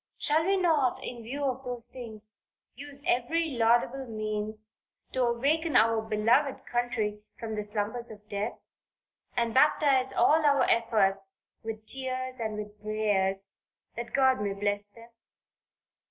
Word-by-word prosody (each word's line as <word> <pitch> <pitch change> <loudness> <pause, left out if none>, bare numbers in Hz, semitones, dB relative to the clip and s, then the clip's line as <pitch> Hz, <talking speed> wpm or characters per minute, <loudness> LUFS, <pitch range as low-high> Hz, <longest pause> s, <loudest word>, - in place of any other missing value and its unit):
Shall 310 +2 +2
we 390 0 +3
not 315 -8 +2
in 240 -1 -6
view 270 +6 -5
of 265 -1 -1
those 245 -2 -3
things 220 -4 -7 0.3
use 285 +2 -9
every 320 +7 +1
laudable 240 +2 +2
means 215 0 -4 0.4
to 260 - 0
awaken 280 +7 +1
our 225 0 +5
beloved 230 +6 +1
country 235 -4 -1 0.2
from 225 -2 -4
the 210 -1 -2
slumbers 210 +3 -2
of 210 -1 -12
death, 205 +2 -3 0.8
and 235 -1 +1
baptize 270 -2 +4
all 315 +1 +4
our 280 -3 +4
efforts 195 -4 +2 0.2
with 220 -1 -6
tears 255 0 -2
and 220 -2 -3
with 210 0 -8
prayers, 205 -3 0 0.4
that 235 0 -5
God 265 -3 +3
may 200 -1 -1
bless 205 +1 -1
them. 230 +3 -15
235 Hz, 140 wpm, -29 LUFS, 215-260 Hz, 0.8 s, our